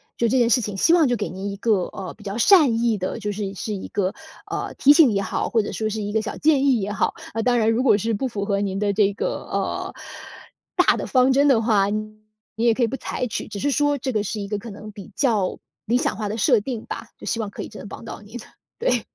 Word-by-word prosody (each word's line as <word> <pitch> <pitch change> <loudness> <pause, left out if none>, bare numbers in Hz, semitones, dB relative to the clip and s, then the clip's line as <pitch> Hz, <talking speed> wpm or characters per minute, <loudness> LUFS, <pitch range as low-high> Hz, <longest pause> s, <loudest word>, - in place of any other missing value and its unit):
就 235 - +1
这 260 - +2
件 240 -2 +4
事 245 - +4
情， 205 -3 -4
希 330 - +4
望 335 -4 +5
就 245 - +1
给 205 -6 -3
您 190 +4 -5
一 200 - -5
个， 205 -3 +1
呃， 185 -3 -7
比 215 - -17
较 200 +1 -4
善 285 - +5
意 230 -1 +2
的 185 -1 -3
就 205 0 -3
是 205 -1 -4
是 215 +3 -4
一 195 - -5
个， 195 -1 -1 0.4
呃， - - -3
提 285 - +6
醒 295 -5 +6
也 200 - +1
好， - - -2
或 225 -2 +2
者 - - -5
说 215 +3 -2
是 215 +1 -3
一 205 0 -3
个 220 - +2
小 215 - -5
建 295 -3 +3
议 260 -4 +4
也 200 0 -3
好， 205 - 0 0.2
呃， 225 - -1
当 245 +1 +2
然 225 -1 +3
如 230 +2 +1
果 250 -6 +4
是 225 +3 -1
不 240 +6 -1
符 210 -5 -4
合 200 -1 0
您 195 -1 -2
的 205 0 +1
这 200 0 +2
个， - - -2 0.2
呃， - - -3 0.8
大 - - +4
的 - - -4
方 255 0 +4
针 280 +2 +4
的 255 -5 +4
话， 215 -4 +3
你 215 +1 -4 0.5
也 230 - +5
可 245 - 0
以 - - +3
不 265 - -4
采 255 - -3
取， 225 - -4
只 200 - -6
是 285 +5 0
说 290 +1 +2
这 260 0 -3
个 215 -3 0
是 210 +1 -3
一 200 - -5
个， 210 - -1
可 230 +3 -8
能 210 +1 -9
比 200 -2 -11
较 215 -8 +1 0.3
理 230 - +1
想 - - -1
化 215 - -3
的 210 - -3
设 235 +1 +4
定 225 +1 -5
吧， - - -6
就 - - -11
希 230 - -1
望 215 -2 -2
可 - - -7
以 - - -8
真 215 - -11
的 - - -9
帮 - - -9
到 - - -8
你 210 +3 -14
的， 240 - -7 0.3
对。 - - +1
220 Hz, 305 characters per minute, -23 LUFS, 205-245 Hz, 0.8 s, 提